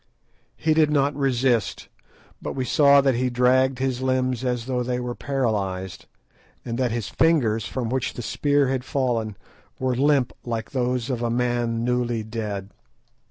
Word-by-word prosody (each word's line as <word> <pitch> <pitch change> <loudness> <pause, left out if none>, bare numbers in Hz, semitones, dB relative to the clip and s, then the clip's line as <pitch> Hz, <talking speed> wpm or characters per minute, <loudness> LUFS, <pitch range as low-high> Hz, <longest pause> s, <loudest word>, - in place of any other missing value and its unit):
He 155 - +2
did 155 -1 +4
not 145 -1 +2
resist, 130 -5 0 0.5
but - - -4
we 130 -1 -2
saw 140 +1 +5
that 135 -1 +2
he 125 +2 0
dragged 130 +1 +3
his 130 -1 -1
limbs 130 -1 0
as 125 -2 -1
though 125 -1 -1
they 125 0 -1
were 125 0 -3
paralysed, 100 -10 -2 0.6
and 115 0 -3
that 125 -2 +2
his 115 -3 -3
fingers, 120 -10 +2
from 125 -3 -3
which 130 +1 -2
the 120 - -5
spear 145 +5 +1
had 130 -1 -1
fallen, 120 -7 -1 0.4
were 130 -1 0
limp 140 -1 +2
like 115 -2 -4
those 125 -2 -1
of 120 -2 -2
a 120 - 0
man 120 -1 0
newly 120 -2 0
dead. 105 -3 -5
125 Hz, 160 wpm, -24 LUFS, 115-130 Hz, 0.6 s, saw